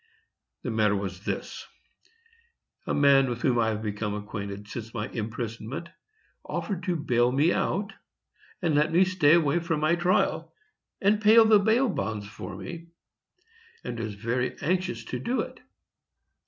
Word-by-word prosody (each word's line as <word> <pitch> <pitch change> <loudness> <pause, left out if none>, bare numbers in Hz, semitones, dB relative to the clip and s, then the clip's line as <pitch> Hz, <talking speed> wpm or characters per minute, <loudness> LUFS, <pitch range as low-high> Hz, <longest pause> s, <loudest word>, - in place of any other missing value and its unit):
The 125 - -2
matter 105 -2 +2
was 95 0 -5
this: - - -4 1.2
A - - 0
man 140 -2 +5
with 120 0 -4
whom 125 -3 +3
I 115 - +2
have 110 -1 -2
become 105 0 -3
acquainted 100 -1 -6
since 115 +1 -7
my 105 -1 -2
imprisonment 115 +7 -5 0.5
offered 195 -4 -4
to 180 -2 0
bail 125 -6 +2
me 150 +7 +3
out 205 +2 -1 0.7
and 165 -3 +2
let 150 +2 +3
me 180 +3 +5
stay 175 -5 +4
away 160 -1 +2
from 165 -2 -1
my 155 +2 +2
trial, 175 +2 +1 0.5
and 210 +2 +3
pay 215 +1 +6
the 220 -2 +7
bail 225 +6 +3
bonds 110 - -3
for 105 - -8
me, 170 -1 -8 1.0
and 115 - -5
was 110 -2 -4
very 120 +4 -2
anxious 185 +3 -1
to - - -4
do 245 +3 -1
it. - - -8
135 Hz, 155 wpm, -27 LUFS, 110-175 Hz, 1.2 s, the